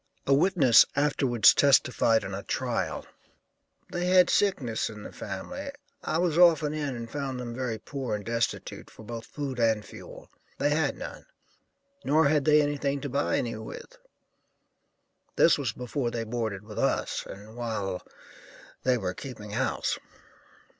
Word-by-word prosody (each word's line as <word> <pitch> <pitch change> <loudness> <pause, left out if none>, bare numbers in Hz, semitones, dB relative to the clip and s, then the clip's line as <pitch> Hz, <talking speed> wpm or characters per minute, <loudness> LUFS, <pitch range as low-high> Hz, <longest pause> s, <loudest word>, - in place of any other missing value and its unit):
A 140 - +3
witness 145 - +6
afterwards 135 -5 +4
testified 125 -5 +4
in 95 0 -6
a 95 - -4
trial: - - -2 0.9
"They 175 0 -1
had 180 -1 +5
sickness 135 - +1
in 105 -2 -9
the - - -8
family; 280 +1 -6 0.3
I 155 - -1
was 170 -1 +1
often 160 -4 +5
in 145 -4 -3
and 115 -1 -6
found 135 -1 -4
them 120 -1 -5
very 120 -2 -3
poor 130 +1 -4
and 105 - -7
destitute, 115 0 -3
for - - -14
both 115 0 -7
food 140 -4 -5
and 110 -2 +2
fuel. - - -12 0.3
They 145 - +1
had 155 +2 +1
none, - - -8 0.8
nor 155 +1 +4
had 150 -2 +2
they 150 -1 +5
anything 145 -1 -1
to 145 - -4
buy 140 +3 0
any 120 - -2
with. 110 - -9 1.4
This 165 - +5
was 130 -6 -1
before 125 +2 -3
they 115 -1 -3
boarded 110 -3 -3
with 105 0 -8
us, - - 0
and 105 +3 -11
while 105 -6 -3 0.8
they 130 -1 +2
were 95 -5 -3
keeping 110 -3 -8
house. - - -1
125 Hz, 155 wpm, -28 LUFS, 115-150 Hz, 1.4 s, witness